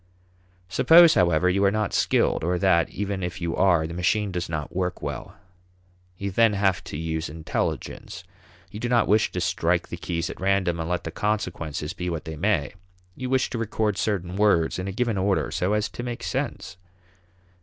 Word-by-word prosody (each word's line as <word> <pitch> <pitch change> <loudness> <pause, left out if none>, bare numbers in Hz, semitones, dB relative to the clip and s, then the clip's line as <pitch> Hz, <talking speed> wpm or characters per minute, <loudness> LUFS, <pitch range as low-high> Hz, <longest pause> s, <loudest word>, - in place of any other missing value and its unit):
Suppose, 165 - +7
however, 85 0 +3
you 95 +2 +2
are 100 - +5
not 105 -1 -1
skilled, - - +2
or 90 +2 +1
that, 85 -3 +3
even 100 -1 -3
if 90 -1 -4
you 85 -1 -2
are, 90 -4 +3
the 80 - -6
machine 100 +4 0
does 90 -2 -3
not 75 0 -4
work 90 -1 -2
well. - - -5 0.8
You 100 +1 -3
then 115 +2 +4
have 95 -3 +1
to - - -6
use 80 0 -3
intelligence. 80 +3 -4 0.5
You 105 - -7
do 120 +1 -2
not 120 -3 +3
wish 105 +1 +3
to 90 - -3
strike 85 0 0
the 85 - -5
keys 85 -1 -3
at - - -11
random 95 -3 +1
and 80 0 -3
let 90 0 -1
the 80 - -5
consequences 85 -8 -2
be 90 0 -4
what 85 -3 -4
they 80 - -5
may; 80 -3 0 0.4
you 130 -1 -5
wish 130 0 +1
to 120 - -3
record 110 -2 -1
certain 95 -3 -2
words 100 -6 +2
in 90 - -4
a - - -2
given 115 0 -1
order 95 +1 0
so 95 +4 0
as 105 0 +1
to - - -7
make 120 -1 -5
sense. - - -4
95 Hz, 195 wpm, -25 LUFS, 85-105 Hz, 0.8 s, Suppose